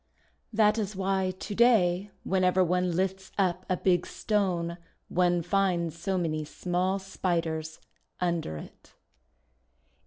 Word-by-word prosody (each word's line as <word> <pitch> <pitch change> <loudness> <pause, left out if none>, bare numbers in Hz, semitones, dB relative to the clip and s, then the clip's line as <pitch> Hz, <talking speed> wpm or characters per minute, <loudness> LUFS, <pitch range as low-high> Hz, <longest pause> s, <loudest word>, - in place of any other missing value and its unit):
That 215 0 +3
is 205 -1 -3
why 190 0 0
to 205 - -5
day, 205 -5 +4
whenever 185 -1 +3
one 180 0 +1
lifts 190 +1 -1
up 185 -2 0
a 185 - +1
big 180 -1 +2
Stone, 180 -5 -1 0.3
one 175 -1 +2
finds 175 -3 +1
so 190 +2 -1
many 155 -3 -1
small 180 +5 -1
Spiders 165 -5 -2 0.4
under 170 - -1
it. - - -13
185 Hz, 120 wpm, -28 LUFS, 175-195 Hz, 0.4 s, day